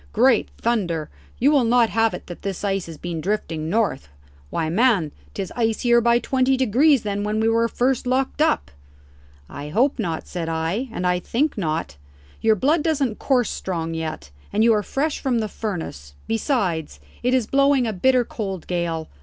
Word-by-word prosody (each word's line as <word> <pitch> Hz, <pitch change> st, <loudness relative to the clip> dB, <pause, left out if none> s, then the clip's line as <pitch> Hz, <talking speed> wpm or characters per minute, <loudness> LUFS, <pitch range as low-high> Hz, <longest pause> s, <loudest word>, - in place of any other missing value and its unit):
Great 240 Hz, +1 st, +4 dB
thunder, 175 Hz, -10 st, -1 dB, 0.3 s
you 275 Hz, +5 st, +4 dB
will 285 Hz, -4 st, +4 dB
not 235 Hz, 0 st, +3 dB
have 225 Hz, 0 st, +2 dB
it -, -, -9 dB
that 175 Hz, -, -9 dB
this 195 Hz, -1 st, -4 dB
ice 195 Hz, -3 st, -1 dB
has 165 Hz, -2 st, -9 dB
been 170 Hz, 0 st, -4 dB
drifting 165 Hz, -5 st, -2 dB
north? 205 Hz, -, 0 dB, 0.4 s
Why, 165 Hz, -1 st, -1 dB
man, 190 Hz, -, +2 dB, 0.2 s
'tis 195 Hz, -2 st, -4 dB
icier 235 Hz, +1 st, +2 dB
by 235 Hz, 0 st, +4 dB
twenty 260 Hz, +2 st, +1 dB
degrees 260 Hz, +2 st, +3 dB
than 205 Hz, -1 st, -2 dB
when 210 Hz, +1 st, -1 dB
we 220 Hz, -, +2 dB
were 230 Hz, +1 st, +3 dB
first 250 Hz, +2 st, 0 dB
locked 260 Hz, +3 st, 0 dB
up." 310 Hz, -, +1 dB, 0.8 s
"I 145 Hz, +2 st, -7 dB
hope 255 Hz, -, +1 dB
not," 170 Hz, -7 st, -3 dB
said 170 Hz, -2 st, -4 dB
I; 165 Hz, +10 st, -2 dB
"and 185 Hz, -, -3 dB
I 180 Hz, 0 st, +2 dB
think 275 Hz, -, 0 dB
not. 155 Hz, -, -2 dB, 0.4 s
Your 220 Hz, -1 st, +4 dB
blood 295 Hz, -, +2 dB
doesn't 280 Hz, -8 st, 0 dB
course 250 Hz, -5 st, +1 dB
strong 165 Hz, -3 st, -3 dB
yet, 155 Hz, -, -5 dB, 0.2 s
and 215 Hz, -, +2 dB
you 230 Hz, 0 st, +5 dB
are 210 Hz, -, +2 dB
fresh 285 Hz, +8 st, -2 dB
from 255 Hz, -3 st, 0 dB
the 220 Hz, -2 st, 0 dB
furnace. 160 Hz, -, -6 dB
Besides, 195 Hz, -, -1 dB, 0.2 s
it 250 Hz, +1 st, +2 dB
is 250 Hz, -4 st, +2 dB
blowing 275 Hz, +1 st, +3 dB
a 220 Hz, -, -1 dB
bitter 250 Hz, +6 st, +3 dB
cold 195 Hz, -7 st, -5 dB
gale. 170 Hz, -3 st, -2 dB
220 Hz, 180 wpm, -22 LUFS, 170-250 Hz, 0.8 s, you